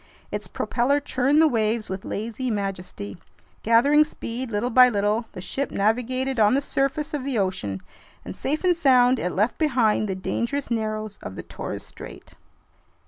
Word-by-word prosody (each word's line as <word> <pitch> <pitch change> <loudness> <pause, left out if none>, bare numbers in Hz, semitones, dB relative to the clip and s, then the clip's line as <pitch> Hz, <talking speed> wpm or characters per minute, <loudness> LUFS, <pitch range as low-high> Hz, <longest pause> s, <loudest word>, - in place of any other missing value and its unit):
Its - - -4
propeller 270 +4 0
churned 280 +1 +1
the 320 - +6
waves 220 -3 0
with 190 0 -5
lazy 230 +4 -4
majesty. 195 - -4 0.4
Gathering 280 +7 +5
speed 255 -4 -6
little 225 +3 -1
by 250 +1 +7
little, 210 +1 0
the 180 - -7
ship 275 +8 -3
navigated 250 +5 0
on 215 +3 +5
the - - +3
surface 285 +3 -1
of 290 -3 -2
the 270 -3 -2
ocean, 180 - -2 0.4
and 90 - -7
safe 300 +5 -2
and 360 -1 +4
sound, 255 -5 +4
it 180 - -1
left 210 +6 0
behind 235 -8 +2
the 190 - -1
dangerous 235 +8 -3
narrows 215 -2 -2
of 95 - -7
the - - -6
Torres - - -6
Strait. - - -11
235 Hz, 165 wpm, -24 LUFS, 210-270 Hz, 0.4 s, by